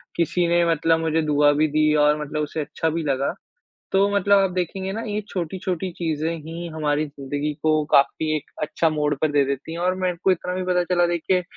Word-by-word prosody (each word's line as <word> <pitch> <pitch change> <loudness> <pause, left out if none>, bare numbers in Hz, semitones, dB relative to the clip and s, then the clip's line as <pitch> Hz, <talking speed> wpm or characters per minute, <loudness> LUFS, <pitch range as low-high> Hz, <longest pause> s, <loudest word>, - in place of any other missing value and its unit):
किसी 170 +1 +1
ने 170 0 +3
मतलब 165 +1 +2
मुझे 160 0 +1
दुआ 150 -1 +3
भी 155 +2 +2
दी 155 0 +2
और 150 0 +2
मतलब 150 +1 -3
उसे 150 +1 -3
अच्छा 160 +3 -2
भी 165 +1 -2
लगा। 140 -2 0 0.6
तो 195 +1 +4
मतलब 200 0 +4
आप 195 -1 +2
देखेंगे 185 +2 -3
ना 220 - -4
ये 210 0 -2
छोटी-छोटी 185 +1 -3
चीज़ें 160 -2 -2
ही 165 +2 -6
हमारी 150 -1 0
ज़िंदगी 145 +1 -4
को 155 -1 +2
काफ़ी 155 +3 +3
एक 150 - -7
अच्छा 165 +2 +1
मोड़ 150 -1 0
पर 155 - +3
दे 145 -1 +4
देती 140 +3 -4
हैं 170 - -5
और 180 +1 +1
मैंने 185 -1 -1
को 190 - +5
इतना 180 0 -1
भी 185 - -2
पता 180 -1 +2
चला 175 0 +2
देखिए 175 +2 0
160 Hz, 215 wpm, -23 LUFS, 150-180 Hz, 0.6 s, को